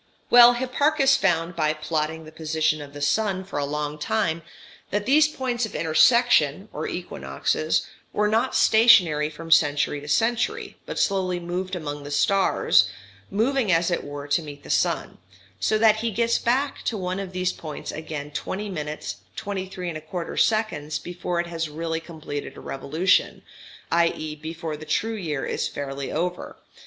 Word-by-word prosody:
Well, 240 0 +9
Hipparchus 270 +3 +2
found, 175 -2 +1
by 155 -2 +1
plotting 155 +1 -3
the 155 - -11
position 155 -1 0
of 145 -1 -10
the 145 0 -5
sun 195 +3 +1
for 190 -6 -5
a 145 - 0
long 150 +1 -3
time, 165 -1 0 0.5
that 205 +1 -1
these 295 +5 +5
points 255 -5 -2
of - - -12
intersection, 165 - +4
or 155 - -3
equinoxes, 155 - -1 0.3
were 210 0 +1
not 220 +2 +1
stationary 180 -10 +5
from 165 +2 -9
century 145 -2 +3
to 145 - -10
century, 245 - 0
but - - -5
slowly 185 -3 +1
moved 180 +2 -4
among 145 -4 -5
the 145 - -7
stars, 145 - +3 0.4
moving 230 +1 +1
as 170 +1 +2
it 175 - -1
were 145 0 -7
to 145 +4 +2
meet 145 -2 -10
the - - -6
sun, - - 0 0.4
so 215 - +2
that 215 -1 +5
he 230 +1 -1
gets 230 +2 +1
back 270 +4 0
to 225 - -1
one 185 0 -3
of 195 -2 -5
these 185 0 -1
points 155 -2 -7
again 150 -2 -6
20 200 +7 -4
minutes 150 -4 -5 0.2
23 190 -3 -4
1/4 160 +2 -5
seconds 155 -10 +1
before 175 +1 -4
it 170 - 0
has 165 -2 -3
really 160 +2 -3
completed 155 -3 -7
a - - -8
revolution, 155 +7 0 0.5
i.e. 165 -2 +1
before 160 +1 -5
the 150 - -10
true 215 +9 -1
year 160 -10 -3
is - - -1
fairly 140 -1 -5
over. 175 +3 -3
170 Hz, 165 wpm, -24 LUFS, 150-210 Hz, 0.5 s, Well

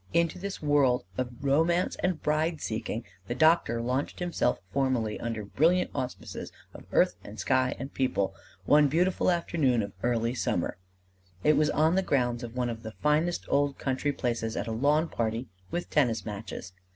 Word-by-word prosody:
Into 170 +2 +2
this 200 -3 -5
world 140 -5 +3
of 130 +3 -1
romance 165 +6 +2
and 180 -3 0
bride 155 +2 +1
seeking 115 0 -3 0.2
the 120 - -2
doctor 155 -6 +4
launched 130 +4 -1
himself 175 -8 0 0.2
formally 130 -6 0
under 115 -3 -3
brilliant 170 - +2
auspices 125 0 -5 0.2
of - - -11
earth - - +4
and - - -10
sky 130 -1 +2
and 135 +2 -7
people 125 -7 0 0.3
one 150 0 +6
beautiful 175 +7 +2
afternoon 155 -9 +1
of 100 -1 -6
early 120 0 +1
summer: 90 -8 -1 0.6
it 150 - +5
was 150 0 +3
on 155 +3 +3
the 190 - +3
grounds 120 -8 0
of 120 -1 -7
one 125 -1 0
of 115 -1 -7
the 110 -1 -7
finest 155 +6 +1
old 140 -1 +1
country 135 +2 -1
places 115 -4 -2
at - - -1
a 115 - -4
lawn 145 +8 +2
party 115 -2 -2 0.2
with 175 0 -3
tennis 115 -8 +2
matches. 105 -3 -6
135 Hz, 170 wpm, -28 LUFS, 115-155 Hz, 0.6 s, one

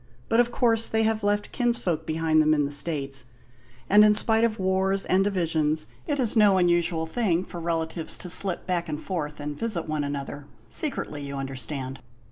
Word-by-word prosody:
But 225 - +3
of 240 0 +3
course 230 -2 +2
they 225 0 +1
have 220 0 0
left 205 0 0
kinsfolk 215 -10 0
behind 160 0 +2
them 155 0 +3
in 145 -1 +1
the 140 - -4
States; 140 -3 -1 0.6
and, 210 +2 +7
in 210 0 +5
spite 225 +1 +3
of 225 -1 +1
wars 190 +1 0
and 190 +1 +3
divisions, 160 -5 0 0.2
it 290 -3 -1
is 240 -3 0
no 205 -3 +5
unusual 175 -2 +2
thing 180 0 0
for 175 - -8
relatives 165 -1 -2
to - - -6
slip 180 +1 +2
back 175 -3 -2
and 150 -1 -3
forth 150 -5 -4
and 145 0 -5
visit 210 -9 0
one 155 -1 -1
another 145 0 -5 0.2
secretly, 270 - -4
you 140 0 -6
understand. 135 0 -5
170 Hz, 185 wpm, -25 LUFS, 150-210 Hz, 0.6 s, and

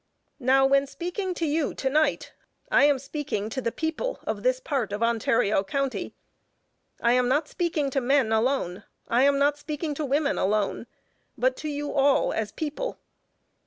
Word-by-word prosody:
Now, 265 +1 +4
when 275 +1 +3
speaking 360 +4 -4
to 335 - -1
you 300 0 0
to 270 - -2
night, 305 +3 +1 0.4
I - - +6
am 290 -1 +4
speaking 275 -6 -4
to 260 - -3
the 230 - -1
people 320 - -3
of - - -3
this - - +1
part 275 - -2
of 210 +3 -2
Ontario 230 -3 +2
County, 275 +6 -3 0.8
I 235 0 +3
am 250 0 +3
not 290 +4 +1
speaking 315 -6 -1
to 270 - 0
men 260 -2 +2
alone, 220 -5 0 0.2
I 240 +2 +2
am 280 0 +4
not 290 +1 +2
speaking 300 +1 -4
to 300 - -4
women 285 +1 0
alone, 210 +3 0 0.5
but 255 +1 +2
to 310 - -5
you 290 0 -3
all 275 0 +3
as 215 -2 -2
people. 315 +12 -4
275 Hz, 170 wpm, -26 LUFS, 245-300 Hz, 0.8 s, I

